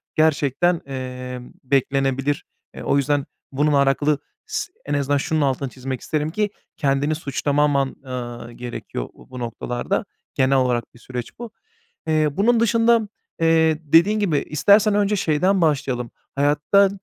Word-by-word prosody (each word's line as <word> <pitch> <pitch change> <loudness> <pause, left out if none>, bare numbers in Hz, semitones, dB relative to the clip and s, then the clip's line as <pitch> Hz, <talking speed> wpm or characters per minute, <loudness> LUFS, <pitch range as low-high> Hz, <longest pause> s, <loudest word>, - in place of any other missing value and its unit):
gerçekten, 155 +2 +2
eee, 125 -1 -5 0.2
beklenebilir. 135 +1 0 0.3
Eee, - - -7
o 140 - +2
yüzden 140 0 +1 0.3
bununla 145 +1 +3
alakalı 145 +1 +2 0.3
s - - -4
en 145 - -3
azından 145 0 +1
şunun 155 +2 0
altını 135 -1 0
çizmek 130 0 -5
isterim 155 0 -1
ki 210 +2 0 0.3
kendini 145 +1 +1
suçlamaman, 145 -1 0
ııı, 120 -2 -6
gerekiyor 120 - -6
bu, - - -18
bu 125 -1 -8
noktalarda. 120 +1 -2 0.3
Genel 135 +1 +3
olarak 125 -3 0
bir 120 - -18
süreç 125 - -7
bu. 235 -2 -7 0.6
Eee, 155 -1 +3
bunun 225 +8 +3
dışında, 230 -1 +3 0.3
eee, 160 -1 +4
dediğin 170 +8 +4
gibi 170 -8 +1
istersen 205 +7 +3
önce 205 0 +2
şeyden 185 +2 +2
başlayalım, 135 -6 0 0.2
hayatta, 150 +8 +3
145 Hz, 135 wpm, -22 LUFS, 130-165 Hz, 0.6 s, eee